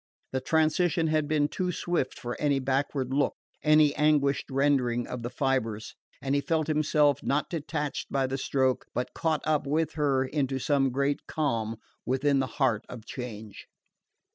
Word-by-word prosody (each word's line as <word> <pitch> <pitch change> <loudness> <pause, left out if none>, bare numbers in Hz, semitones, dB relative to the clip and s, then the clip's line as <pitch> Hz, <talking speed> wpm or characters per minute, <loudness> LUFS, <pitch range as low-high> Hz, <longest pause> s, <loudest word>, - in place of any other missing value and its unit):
The 130 - -1
transition 160 +2 +2
had 155 -1 +1
been 150 -1 +2
too 180 +3 -2
swift 175 -6 -2
for 120 0 -5
any 145 -2 +2
backward 135 0 -1
look, 140 +1 +1 0.3
any 150 -1 +5
anguished 150 -2 +2
rending 130 -3 +1
of 125 - -6
the 120 - -4
fibres, 120 -4 -1 0.3
and 135 0 0
he 140 - +2
felt 155 +2 0
himself, 150 -1 +2
not 145 +2 -1
detached 150 -3 -3
by 135 -1 +1
the 135 +1 -3
stroke, 130 -1 +1
but 125 - -2
caught 160 -2 0
up 150 -2 +1
with 155 +3 0
her 140 -4 +1
into 135 -1 -1
some 135 0 +2
great 140 +2 -1
calm 115 -8 -1 0.3
within 135 +2 +1
the 130 - 0
heart 120 -7 +2
of 115 -3 -9
change. 110 -4 -8
140 Hz, 165 wpm, -28 LUFS, 130-150 Hz, 0.3 s, any